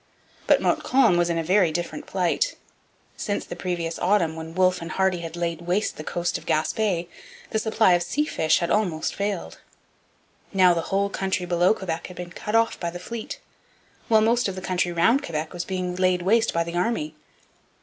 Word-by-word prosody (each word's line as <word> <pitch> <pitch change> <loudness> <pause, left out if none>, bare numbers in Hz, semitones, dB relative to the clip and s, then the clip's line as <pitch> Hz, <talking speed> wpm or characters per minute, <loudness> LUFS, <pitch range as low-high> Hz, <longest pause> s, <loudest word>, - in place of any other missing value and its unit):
But - - +4
Montcalm 260 -9 +3
was 175 0 +2
in 170 - 0
a 165 - 0
very 180 0 +3
different 170 +2 -4
plight. 190 - 0 0.6
Since 205 - -2
the - - -7
previous 170 -2 -3
autumn, 175 -4 +2
when 160 0 -8
Wolfe 185 -1 +3
and 165 - -6
Hardy 190 -2 +1
had 165 -1 -6
laid 170 -1 -2
waste 180 +5 0
the 155 - -7
coast 175 +2 -2
of - - -18
Gaspe, 170 +3 0 0.4
the 220 - +1
supply 220 -3 +3
of 175 - +3
sea 295 +12 0
fish 160 - +2
had 170 - -1
almost 180 -7 0
failed. 200 -2 -3 0.9
Now 185 -2 +5
the 170 - 0
whole 200 +1 +1
country 190 -2 -1
below 175 +3 +3
Quebec 165 -5 -4
had 180 - -12
been 175 -1 -7
cut 210 +4 -4
off 230 0 +2
by 170 - -2
the 175 - -7
fleet, 230 - -6 0.7
while 220 -2 +5
most 235 +2 +2
of 195 - -4
the - - -5
country 180 -1 0
round 225 +11 +3
Quebec 155 - -4
was 175 -1 -4
being 185 -1 -3
laid 185 -1 +1
waste 225 +4 +3
by 170 - +1
the 170 0 -6
army. 175 -4 -1
180 Hz, 195 wpm, -24 LUFS, 170-200 Hz, 0.9 s, Now